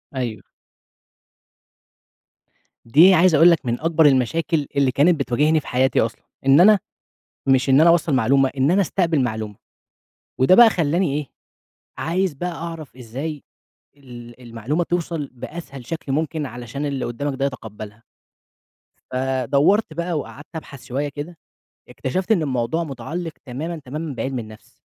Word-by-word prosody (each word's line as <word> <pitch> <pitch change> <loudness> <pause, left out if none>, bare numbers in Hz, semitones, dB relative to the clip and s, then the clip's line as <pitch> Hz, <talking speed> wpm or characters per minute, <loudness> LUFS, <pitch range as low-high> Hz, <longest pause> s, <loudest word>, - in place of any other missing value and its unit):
أيوه. 120 -4 -4 2.4
دي 160 +11 +6
عايز 180 -2 +5
أقول 170 +4 +7
لَك 165 - 0
من 120 0 -1
أكبر 160 -1 +3
المشاكل 145 +3 +2
اللي 140 -2 +2
كانت 150 +4 +3
بتواجهني 150 +5 +2
في 145 - -12
حياتي 130 +1 +2
أصلًا. 115 - -3 0.2
إن 135 +2 +6
أنا 210 +2 +6 0.7
مش 135 0 +3
إن 135 +3 +6
أنا 170 - +6
أوصّل 170 -2 +2
معلومة، 135 +2 +3
إن 135 +4 +2
أنا 195 +2 +3
استقبل 165 -3 0
معلومة. 110 -3 -4 0.8
وده 130 +9 +5
بقى 235 +1 +8
خلّاني 165 -3 0
إيه، 150 -2 -4 0.7
عايز 180 0 -1
بقى 175 +6 -4
أعرَف 165 -4 -8
إزاي 135 +6 -6 0.5
ال 120 -3 -12
المعلومة 120 +8 -3
توصَل 165 -4 -3
بأسهل 135 -1 -9
شكل 160 -4 -5
ممكن، 155 +1 -2
علشان 125 +3 -6
اللي 140 -2 -3
قدامك 140 +4 -3
ده 135 - 0
يتقبلها. 110 -4 -8 1.1
فدورْت 135 - +1
بقى 170 +2 -3
وقعدْت 145 0 -9
أبحث 140 -4 -9
شوية 140 +4 -3
كده، 145 +4 -8 0.5
اكتشفْت 185 - -3
إن 200 -6 +3
الموضوع 130 +2 -1
متعلق 160 +4 -5
تمامًا 150 +7 -5
تمامًا 150 +3 -5
بعلم 130 +1 -3
النفْس. 110 -1 -12
145 Hz, 140 wpm, -21 LUFS, 130-165 Hz, 2.4 s, بقى